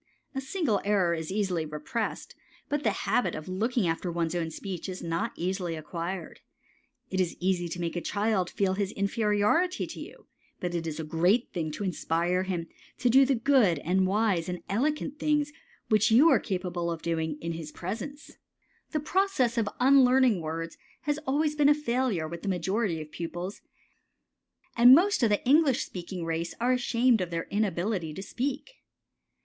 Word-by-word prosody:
A 270 - -3
single 270 - 0
error 195 -4 +2
is 160 0 -4
easily 190 -5 0
repressed, 155 - -4 0.4
but 290 0 0
the - - +2 0.2
habit 245 - +1
of 155 - -7
looking 215 +4 0
after 170 +2 -1
one's 165 -1 -1
own 170 -2 -1
speech 185 +2 -6
is 185 -1 -6
not 170 +7 -1
easily 180 -1 -2
acquired. 170 +2 -5 0.7
It 190 0 +1
is 180 - -2
easy 180 -1 0
to 175 - -5
make 170 0 -3
a 175 - -2
child 205 -3 0
feel 195 -2 0
his 195 0 -1
inferiority 210 - +1
to - - -9
you, - - -11 0.3
but 180 -1 -3
it 165 -1 -2
is 160 0 -4
a - - -2
great 175 +10 +1
thing 165 -4 -2
to 205 - -4
inspire 175 -1 0
him 185 -3 -2 0.3
to 250 -1 +2
do 270 +2 +7
the 270 - +3
good 235 - +3
and 185 +5 +1
wise 195 -4 +1
and 180 0 -5
elegant 295 +6 -1
things 295 -1 +1 0.4
which 215 -1 +4
you 255 +9 +7
are - - +5
capable 180 -3 -3
of 165 -1 -4
doing 160 -2 -1
in 170 - -4
his 160 -2 -6
presence. 235 - -7 0.6
The 305 - +1
process 320 - +1
of 225 -4 +1
unlearning 255 -5 +5
words 165 +1 -5 0.2
has 295 0 -1
always 300 +3 +1
been 295 -1 +4
a 295 - +6
failure 245 - -1
with 170 +1 -7
the 200 - -3
majority 190 0 0
of 150 - -16
pupils, 175 +3 -5 1.1
and 245 +2 +9
most 390 +4 +3
of 230 - +4
the 205 +4 0
English 280 -2 +4
speaking 180 -1 -6
race 165 +1 -3
are 245 +2 +2
ashamed 245 -2 +2
of 180 - -2
their 165 -1 -2
inability 190 -5 -1
to 190 - -6
speak. 280 - -4
195 Hz, 175 wpm, -28 LUFS, 170-250 Hz, 1.1 s, and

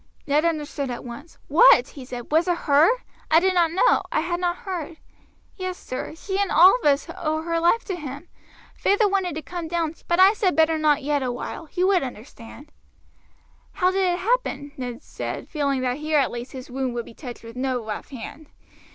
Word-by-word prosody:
Ned 300 +1 +2
understood 295 -4 -2
at 245 - -5
once. 265 +7 -10
"What!" 275 -4 +6
he 270 -3 -10
said; 245 0 -8
"was 325 +3 +3
it 350 -1 +1
her? 295 +2 +4 0.4
I 320 - +6
did 375 +2 +2
not 345 -2 +3
know; 360 - +3
I - - +1
had 345 +1 -2
not 350 -1 0
heard." 340 -4 -5 0.6
"Yes, 370 -1 -4
sir; 255 +4 -6
she 385 +4 -3
and 400 - 0
all 365 +6 +7
of - - -15
us 280 -1 +3
owe 315 0 -2
her 335 0 -1
life 345 +8 +2
to 380 - -3
him. 290 0 -8 0.5
Feyther 410 +2 +2
wanted 385 -5 -1
to 315 - -5
come 345 -2 -6
down 330 -1 -1
to - - -26
you, - - -27
but 345 +1 +1
I 380 +2 +7
said 400 -4 0
better 320 0 +3
not 300 -2 +2
yet 290 0 0
awhile, 255 +5 -5
you 365 0 +1
would 380 -2 +3
understand." 255 +3 -10 1.0
"How 365 0 +2
did 375 -1 +1
it 350 - -1
happen?" 365 - -1
Ned 245 -2 -6
said, - - -6
feeling 280 -4 -1
that 250 0 -1
here 305 0 0
at 275 - +2
least 240 +1 -7
his 255 -1 -9
wound 260 -1 -2
would 235 - -3
be - - -13
touched 245 -2 -9
with 230 +1 -11
no 255 -2 -2
rough 215 - -6
hand. 280 +4 -9
310 Hz, 210 wpm, -24 LUFS, 270-355 Hz, 1.0 s, all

